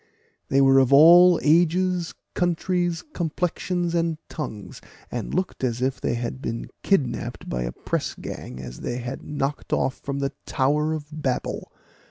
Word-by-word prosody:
They 135 +1 +3
were 135 0 +6
of 130 0 +3
all 170 +5 +8
ages, 175 +2 +2 0.2
countries, 175 0 0
complexions, 175 +1 -1
and 165 -2 0
tongues, 105 - -6 0.3
and 120 -2 -4
looked 185 -6 -2
as 120 -2 0
if 130 0 -1
they - - 0
had 120 +2 -4
been 115 -2 -4
kidnapped 150 -11 -1
by 60 - -2
a - - -3
pressgang 65 +1 -5
as 60 -1 -8
they 120 - -3
had 125 +2 -5
knocked 145 -1 -3
off 130 - 0
from 140 0 -4
the 140 -1 -2
Tower 150 +4 +1
of 155 -2 -4
Babel. 145 -5 -3
145 Hz, 150 wpm, -24 LUFS, 130-170 Hz, 0.3 s, all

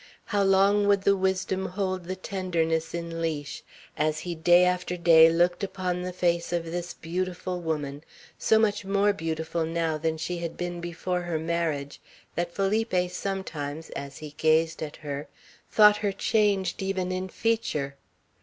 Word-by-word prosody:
How 205 -2 0
long 200 +1 +4
would 200 -1 +3
the 200 0 +4
wisdom 190 0 0
hold 185 -1 -2
the 185 +2 -3
tenderness 170 -4 -1
in 170 -1 -4
leash, 150 -3 -3 0.3
as 155 0 0
he 175 - -4
day 175 +2 +5
after 180 0 0
day 165 -1 +7
looked 175 +3 +2
upon 185 -2 -2
the 180 0 -3
face 170 -1 0
of 170 -1 -1
this 175 +1 -4
beautiful 180 +1 -3
woman, 150 -3 -3 0.3
so 220 - +3
much 210 -2 +2
more 200 +1 +2
beautiful 165 -2 -2
now 165 -1 -1
than 160 0 -1
she 170 +2 -3
had 170 -1 -5
been 175 -1 -4
before 175 +1 -2
her 175 -2 -2
marriage, 160 -3 -2 0.3
that 175 +1 -2
Felipe 195 -2 0
sometimes, 165 -6 -4
as 140 0 -6
he 150 -1 -9
gazed 160 +1 +2
at 150 -2 -5
her, 145 -1 -6 0.4
thought 210 -1 +7
her 205 -1 0
changed 195 -2 +1
even 190 -1 -1
in 185 +1 -3
feature? 165 -12 -1
175 Hz, 160 wpm, -27 LUFS, 160-190 Hz, 0.4 s, day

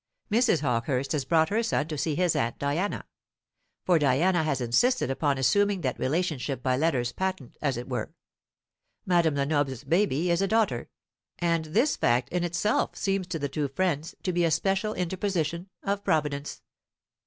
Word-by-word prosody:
Mrs. 220 - +3
Hawkehurst 125 0 -1
has 145 -4 -1
brought 160 +2 +3
her 215 +3 +1
son 190 -10 0
to 155 - -3
see 150 +1 -1
his 180 0 +1
aunt 115 0 -1
Diana; 155 +8 -2 0.8
for 175 -3 +4
Diana 155 +6 +3
has 150 -3 0
insisted 135 - +2
upon 140 0 0
assuming 200 +8 +2
that 130 -5 -2
relationship 140 -4 -1
by 130 -1 +2
letters 130 -5 +1
patent, 185 -5 -4
as 140 -4 0
it 120 - -6
were. - - -3 0.9
Madame 170 -4 +3
Lenoble's 140 -2 0
baby 170 +1 +1
is 170 +2 +2
a 195 - +2
daughter, 220 +1 +1 0.5
and 165 -2 0
this 230 - +1
fact 120 +2 +1
in 175 0 -1
itself 175 +5 0
seems 195 -2 -1
to 175 -2 -3
the 145 -2 -2
two 145 +1 -2
friends 155 +1 -2
to 185 - -1
be 175 0 +2
a 165 - +3
special 195 +6 0
interposition 180 -1 -2
of 200 0 -1
Providence. 150 -5 -1
160 Hz, 165 wpm, -27 LUFS, 140-185 Hz, 0.9 s, for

